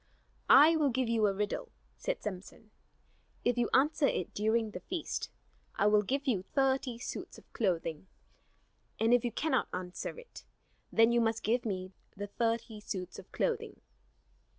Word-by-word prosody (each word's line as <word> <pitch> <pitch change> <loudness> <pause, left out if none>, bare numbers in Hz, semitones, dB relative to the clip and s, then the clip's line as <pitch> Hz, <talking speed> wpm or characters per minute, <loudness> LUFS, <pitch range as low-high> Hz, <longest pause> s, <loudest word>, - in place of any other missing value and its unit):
"I 305 +5 +8
will 295 -3 +3
give 255 -1 0
you 225 -2 +3
a 200 - +1
riddle," 210 - -2 0.3
said - - -3
Samson. 210 +2 -7 0.7
"If 245 - +3
you 240 -1 +1
answer 290 +2 +3
it 180 - -2
during 220 +1 +1
the 180 - -6
feast, 345 - -4 0.5
I 200 - +1
will 210 0 +5
give 275 +7 -2
you 230 -9 +1
thirty 265 -3 +1
suits 240 - -6
of - - -19
clothing; 175 -4 -1 0.9
and 225 +2 +4
if 245 - +4
you 240 - -1
cannot 315 +8 0
answer 180 - -5
it 485 0 -12 0.5
then 225 +1 +5
you 235 0 +3
must 225 0 0
give 240 +3 +1
me 185 -2 -3 0.3
the 205 - -3
thirty 225 +1 -2
suits 185 -3 -6
of - - -14
clothing." - - -2
225 Hz, 160 wpm, -32 LUFS, 205-260 Hz, 0.9 s, I